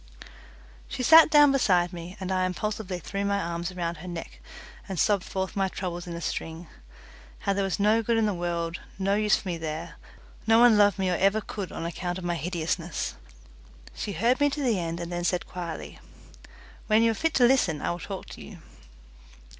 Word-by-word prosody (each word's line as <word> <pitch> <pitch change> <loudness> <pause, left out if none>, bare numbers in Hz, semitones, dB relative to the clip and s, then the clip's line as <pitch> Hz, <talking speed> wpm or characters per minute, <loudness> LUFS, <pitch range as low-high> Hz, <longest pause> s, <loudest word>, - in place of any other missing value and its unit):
She 255 - -4
sat 320 +5 +8
down 295 -2 +7
beside 180 -9 +2
me, 175 +1 -8
and 190 -1 -4
I 185 -1 +1
impulsively 205 0 -3
threw 195 +3 -4
my 200 0 +1
arms 170 0 -3
around 170 -2 -3
her 170 +4 -10
neck 170 -2 -7 0.5
and 190 -4 -3
sobbed 205 -3 +2
forth 190 -1 -4
my 195 -1 +1
troubles 175 -2 -5
in 170 - -5
a 170 - -6
string. 165 +1 -4 0.8
How 200 - +1
there 200 0 0
was 195 0 -2
no 215 +3 +3
good 230 +1 +1
in 225 - +3
the 210 - +1
world, 170 -1 -3 0.2
no 195 +1 0
use 210 0 +3
for - - -6
me 170 -2 -3
there, 160 0 -5 0.5
no 225 0 +6
one 240 -1 +7
loved 205 -1 +4
me 190 -2 0
or 175 - +1
ever 195 +3 +3
could 200 -3 -6
on - - -5
account 175 +1 -3
of 185 - -7
my 175 0 -1
hideousness. 170 0 -3 0.8
She 205 - -4
heard 235 - +2
me 290 0 +4
to 285 +1 -3
the 230 -7 +1
end 170 0 -3
and 170 0 -5
then 175 0 -3
said 175 +1 0
quietly, 170 -3 -7 0.9
"When 215 +1 +4
you 230 - +4
are - - -1
fit 325 +8 -1
to 250 - +5
listen 240 - +3
I - - -1
will 175 - -4
talk 195 +1 -6
to - - -10
you." - - -10
185 Hz, 210 wpm, -27 LUFS, 175-215 Hz, 0.9 s, sat